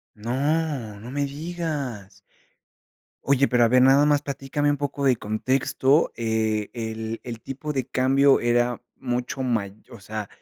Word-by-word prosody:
¡No! 130 Hz, -1 st, -1 dB
no 115 Hz, -, -9 dB
me 145 Hz, +1 st, -1 dB
digas. 140 Hz, -, -5 dB, 1.0 s
Oye, 140 Hz, 0 st, +3 dB
pero 120 Hz, -2 st, +3 dB
a 115 Hz, -, +6 dB
ver, 125 Hz, +2 st, +5 dB
nada 135 Hz, +2 st, +6 dB
más 145 Hz, -1 st, +2 dB
platícame 140 Hz, +1 st, -1 dB
un 145 Hz, -, -1 dB
poco 140 Hz, 0 st, -3 dB
de 130 Hz, -2 st, +5 dB
contexto. 130 Hz, +6 st, +1 dB
Eh, 110 Hz, -2 st, -1 dB
el 110 Hz, -1 st, -4 dB
el 120 Hz, -2 st, -6 dB
tipo 135 Hz, +5 st, -6 dB
de 130 Hz, -4 st, -2 dB
cambio 135 Hz, +2 st, +4 dB
era 120 Hz, 0 st, +1 dB
mucho 125 Hz, +2 st, -3 dB
mayo 110 Hz, -6 st, -1 dB, 0.2 s
o 115 Hz, -, -12 dB
sea, 105 Hz, +1 st, -6 dB
130 Hz, 150 wpm, -24 LUFS, 115-140 Hz, 1.0 s, a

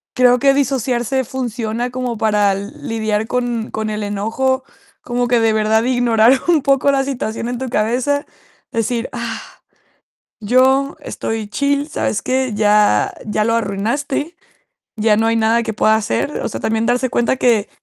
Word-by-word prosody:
creo 250 Hz, 0 st, +5 dB
que 275 Hz, +1 st, +4 dB
disociarse 260 Hz, -2 st, 0 dB
funciona 240 Hz, -1 st, -3 dB
como 250 Hz, -2 st, -3 dB
para 210 Hz, -2 st, +2 dB
lidiar 215 Hz, +2 st, -3 dB
con 240 Hz, -2 st, -2 dB
con 220 Hz, 0 st, -3 dB
el 210 Hz, 0 st, -3 dB
enojo, 225 Hz, +6 st, -1 dB, 0.4 s
como 245 Hz, 0 st, -1 dB
que 240 Hz, -1 st, +3 dB
de 225 Hz, -1 st, +3 dB
verdad 220 Hz, +1 st, +2 dB
ignorar 245 Hz, 0 st, +3 dB
un 325 Hz, -4 st, +4 dB
poco 275 Hz, 0 st, +3 dB
la 270 Hz, -1 st, +1 dB
situación 235 Hz, -4 st, -3 dB
en 245 Hz, -, -3 dB
tu 260 Hz, -, -4 dB
cabeza, 250 Hz, +6 st, 0 dB, 0.5 s
decir: 230 Hz, +1 st, -2 dB
"Ah, -, -, -4 dB, 1.0 s
yo 260 Hz, +5 st, +2 dB
estoy 220 Hz, -2 st, -4 dB
chill, 280 Hz, +6 st, 0 dB
¿sabes 210 Hz, -8 st, -2 dB
qué?, 260 Hz, -1 st, 0 dB
ya 210 Hz, -, +3 dB
ya 210 Hz, 0 st, 0 dB
lo 230 Hz, +1 st, +1 dB
arruinaste, 235 Hz, -, -2 dB, 0.6 s
ya 210 Hz, -1 st, +3 dB
no 225 Hz, -, +2 dB
hay 230 Hz, -, +2 dB
nada 225 Hz, +1 st, +2 dB
que 225 Hz, -1 st, -3 dB
pueda 215 Hz, +1 st, +3 dB
hacer". 220 Hz, +6 st, -1 dB
O -, -, -2 dB
sea, -, -, -5 dB
también 225 Hz, +1 st, 0 dB
darse 250 Hz, +1 st, +1 dB
cuenta 240 Hz, 0 st, +1 dB
que. 230 Hz, -6 st, +2 dB
235 Hz, 160 wpm, -18 LUFS, 220-260 Hz, 1.0 s, creo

